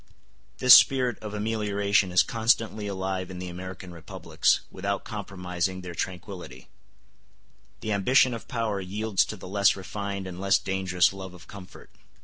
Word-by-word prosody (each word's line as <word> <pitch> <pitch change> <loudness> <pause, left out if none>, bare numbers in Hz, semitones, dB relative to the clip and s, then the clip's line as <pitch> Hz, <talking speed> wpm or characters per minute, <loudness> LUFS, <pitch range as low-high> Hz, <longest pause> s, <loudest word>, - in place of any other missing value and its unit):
This 125 -1 +8
spirit 125 -4 +5
of 105 -1 -7
amelioration 105 -3 0
is 90 - +5
constantly 110 -2 0
alive 95 -1 -3
in 95 - -8
the 90 0 -6
American 95 +1 -8
republics, 85 -2 0
without 100 +1 -3
compromising 95 -3 -4
their 90 -1 -8
tranquillity; 90 - -7 1.1
the 110 - -3
ambition 125 +5 +3
of 115 - -7
power 110 -5 -2
yields 100 +2 0
to - - -6
the 95 - -10
less 100 +1 +3
refined 100 +1 -5
and 90 0 -7
less 100 0 +4
dangerous 95 -2 +1
love 95 -2 -9
of 85 - -15
comfort. 95 -3 -12
95 Hz, 145 wpm, -26 LUFS, 90-105 Hz, 1.1 s, This